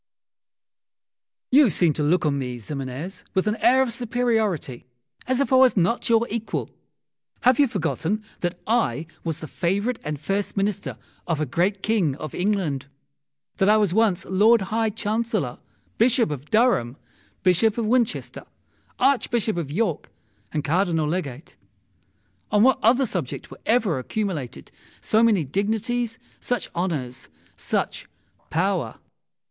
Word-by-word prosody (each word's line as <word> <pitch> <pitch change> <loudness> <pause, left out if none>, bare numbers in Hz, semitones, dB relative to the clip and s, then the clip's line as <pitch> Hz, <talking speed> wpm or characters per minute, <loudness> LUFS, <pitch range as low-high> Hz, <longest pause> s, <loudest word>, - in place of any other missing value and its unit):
You 275 -1 +6
seem 170 -2 +2
to 150 - -3
look 165 +4 +2
on 140 -2 +1
me, 125 -2 -4
Ximenes, 140 - -6
with 190 - +2
an 210 0 +1
air 260 +2 +4
of 240 -3 -3
superiority, 220 - -1 0.4
as 260 0 +1
if 280 -1 +1
I - - +7
was 255 -3 +5
not 190 +8 +1
your 230 0 +4
equal. 225 0 -3 0.7
Have 250 +1 +4
you 285 - +6
forgotten 200 +1 -2 0.2
that 175 0 -3
I 190 - +1 0.2
was 165 -2 -4
the 155 - -6
favourite 200 - -1
and 150 -2 -4
first 195 +7 -2
Minister 200 0 -1 0.3
of 165 -3 0
a 155 - 0
great 185 +8 0
King 195 -11 +1
of 155 0 -7
England? 180 -9 -1 0.7
that 195 - +3
I 215 - +6
was 205 -4 +2
at - - -2
once 220 -5 +2
Lord 215 +4 +4
High 225 0 +2
Chancellor, 215 - -2 0.4
Bishop 235 - +3
of 145 -1 -5
Durham, 215 - +2 0.5
Bishop 200 +5 +3
of 230 - 0
Winchester, 235 0 -1 0.5
Archbishop 240 -6 +2
of 165 -5 -3
York, 175 0 -1 0.4
and 150 -2 -2
Cardinal 165 0 +1
Legate? 150 -4 -4 0.9
On 210 0 +4
what 260 0 +4
other 245 +5 +4
subject 175 - -5
were - - -12
ever 215 - +2
accumulated 145 - -4 0.3
so 220 - +2
many 220 -7 +4
dignities, 225 - -1 0.2
such 245 -6 -3
honours, 150 -8 -3 0.3
such - - -2 0.4
power? 175 - 0
195 Hz, 140 wpm, -24 LUFS, 155-225 Hz, 0.9 s, I